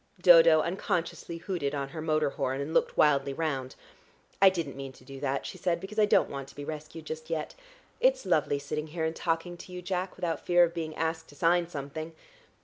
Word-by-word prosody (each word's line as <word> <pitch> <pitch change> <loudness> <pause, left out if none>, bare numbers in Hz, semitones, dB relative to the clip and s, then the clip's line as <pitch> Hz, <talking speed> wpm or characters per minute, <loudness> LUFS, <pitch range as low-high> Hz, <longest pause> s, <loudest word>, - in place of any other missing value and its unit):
Dodo 165 -3 +8
unconsciously 170 -1 -2
hooted 165 -5 -3
on 140 -1 -3
her 155 +3 -6
motor 155 -2 +1
horn, 135 0 -2
and 140 +3 -4
looked - - +1
wildly 140 -2 +4
round. 135 -5 -2 0.7
"I 195 - +9
didn't 165 -7 -4
mean 135 -1 -6
to 130 - -18
do 135 0 -9
that," 135 0 -1
she - - -7
said, 175 -3 0
"because 200 +4 -5
I 210 - +5
don't - - +4
want 140 -1 -6
to 140 - -15
be 145 - -7
rescued 155 +1 -7
just 160 +1 -6
yet. 160 -2 -3 0.5
It's - - +3
lovely 145 - +2
sitting 150 +2 -4
here 160 +1 -3
and 160 0 -2
talking 170 +1 -2
to 180 - -11
you, 180 0 -7
Jack, 185 0 -2
without 170 -2 -3
fear 175 0 +5
of 170 -1 +1
being 160 -2 -4
asked 160 0 -2
to 145 - -15
sign 170 +3 +3
something. 155 +1 -6
160 Hz, 215 wpm, -29 LUFS, 145-175 Hz, 0.7 s, I